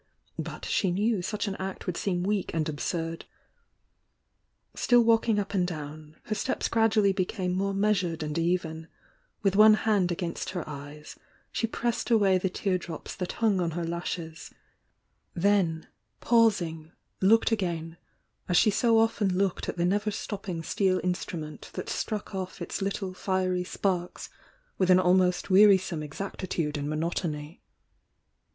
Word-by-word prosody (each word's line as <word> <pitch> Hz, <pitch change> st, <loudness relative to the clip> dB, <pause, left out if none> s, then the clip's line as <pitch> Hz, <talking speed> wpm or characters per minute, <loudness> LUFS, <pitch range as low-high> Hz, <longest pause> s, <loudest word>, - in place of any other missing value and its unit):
— -, -, -20 dB
but -, -, -8 dB
she 190 Hz, -, +1 dB
knew 205 Hz, +3 st, +1 dB
such 210 Hz, +4 st, -3 dB
an 200 Hz, -, -2 dB
act 190 Hz, 0 st, -5 dB
would 180 Hz, -, -2 dB
seem 180 Hz, -2 st, -1 dB
weak 200 Hz, 0 st, -1 dB
and 160 Hz, -1 st, 0 dB
absurd. 165 Hz, +2 st, -3 dB, 1.5 s
Still 245 Hz, -1 st, +4 dB
walking 225 Hz, -1 st, +3 dB
up 200 Hz, 0 st, -2 dB
and 180 Hz, -3 st, +1 dB
down, 155 Hz, -2 st, -7 dB
her 215 Hz, -, -3 dB
steps 255 Hz, -, -1 dB
gradually 220 Hz, -3 st, +3 dB
became 185 Hz, -1 st, -1 dB
more 195 Hz, +1 st, -1 dB
measured 185 Hz, -5 st, +1 dB
and 150 Hz, -1 st, -4 dB
even, 165 Hz, -1 st, -1 dB, 0.3 s
— -, -, -42 dB
with 195 Hz, -1 st, +2 dB
one 215 Hz, +1 st, +8 dB
hand 205 Hz, -5 st, +1 dB
against 170 Hz, -1 st, -3 dB
her 180 Hz, -3 st, -4 dB
eyes, 150 Hz, +1 st, -9 dB, 0.3 s
she 230 Hz, -, -1 dB
pressed 235 Hz, +1 st, -2 dB
away 200 Hz, -5 st, +4 dB
the 190 Hz, -, 0 dB
tear 185 Hz, 0 st, -1 dB
drops 170 Hz, -2 st, -7 dB
that 180 Hz, -, -4 dB
hung 210 Hz, -5 st, +1 dB
on 170 Hz, -, 0 dB
her 175 Hz, -, -1 dB
lashes 170 Hz, -1 st, -5 dB, 0.4 s
— -, -, -47 dB, 0.2 s
then, 165 Hz, -6 st, +1 dB, 0.3 s
pausing, 175 Hz, -9 st, +2 dB, 0.3 s
looked 225 Hz, +5 st, +4 dB
again, 170 Hz, -6 st, -2 dB, 0.5 s
as 175 Hz, -, +3 dB
she 215 Hz, -, +5 dB
so 230 Hz, +2 st, +3 dB
often 215 Hz, -4 st, +2 dB
looked 195 Hz, -2 st, 0 dB
at -, -, -4 dB
the 175 Hz, -, +1 dB
never 205 Hz, +4 st, +1 dB
stopping 195 Hz, -5 st, -5 dB
steel 185 Hz, +2 st, +1 dB
instrument 170 Hz, -4 st, -4 dB
that -, -, -5 dB
struck 215 Hz, -1 st, -3 dB
off 190 Hz, 0 st, -5 dB
its 175 Hz, +3 st, -4 dB
little 195 Hz, -1 st, -2 dB
fiery 185 Hz, -1 st, 0 dB
sparks 180 Hz, -1 st, -2 dB, 0.5 s
with 185 Hz, -1 st, +2 dB
an 185 Hz, 0 st, +7 dB
almost 180 Hz, 0 st, +2 dB
wearisome 190 Hz, -4 st, +5 dB
exactitude 160 Hz, 0 st, -4 dB
and 145 Hz, 0 st, -3 dB
monotony. 155 Hz, 0 st, -3 dB
185 Hz, 155 wpm, -28 LUFS, 165-205 Hz, 1.5 s, one